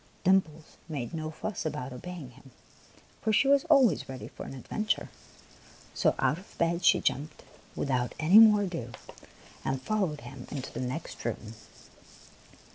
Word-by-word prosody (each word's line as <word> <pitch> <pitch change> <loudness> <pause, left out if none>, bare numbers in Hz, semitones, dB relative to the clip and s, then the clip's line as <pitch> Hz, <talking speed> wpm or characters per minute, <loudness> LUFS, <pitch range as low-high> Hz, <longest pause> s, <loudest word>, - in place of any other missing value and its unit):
Dimples 170 -5 +1
made 140 -5 -4
no 155 -1 -3
fuss 195 +6 -5
about 130 -4 -4
obeying 155 0 -8
him, 135 +2 -17 0.7
for 220 - +1
she 245 +6 +4
was 280 +1 +4
always 270 - +4
ready 130 -1 -7
for - - -9
an - - -7
adventure; 215 - -2 0.8
so - - +2
out 155 - +1
of 190 - -17
bed 170 +1 +1
she - - +6
jumped 150 +3 -2 0.3
without 125 -4 -1
any 175 +7 +7
more 210 -2 +7
ado, 165 -11 -5 0.7
and 135 0 -1
followed 165 0 -1
him 135 -3 -10
into 135 -3 -6
the - - -5
next 130 +6 -5
room. 115 -1 -4
155 Hz, 150 wpm, -29 LUFS, 130-195 Hz, 0.8 s, any